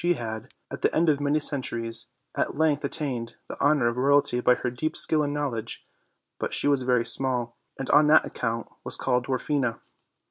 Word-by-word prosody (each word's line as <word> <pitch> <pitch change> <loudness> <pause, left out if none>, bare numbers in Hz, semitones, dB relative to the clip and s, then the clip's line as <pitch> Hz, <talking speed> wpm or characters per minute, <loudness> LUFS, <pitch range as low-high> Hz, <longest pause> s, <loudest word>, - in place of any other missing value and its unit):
She 175 0 +3
had, 115 0 -6 0.2
at - - -6
the - - +2
end 165 0 +3
of 145 -2 +1
many 145 +1 +1
centuries, 115 -6 -1 0.3
at - - -2
length 150 -2 +1
attained 130 -6 -3
the - - -7
honor 145 -3 +3
of 120 +1 0
royalty 140 -1 +3
by 125 0 +4
her 125 - -3
deep 155 +6 -3
skill 155 -1 +3
and 145 -1 -1
knowledge; 130 -6 -4 0.5
but - - -2
she - - +1
was 140 -2 +2
very 125 -2 +1
small, 120 -1 +1 0.2
and 135 - -5
on 150 +1 +6
that 155 +1 +5
account 115 -1 -3 0.2
was - - -1
called 125 -1 0
Dwarfina. 130 -2 -1
130 Hz, 190 wpm, -26 LUFS, 120-145 Hz, 0.5 s, on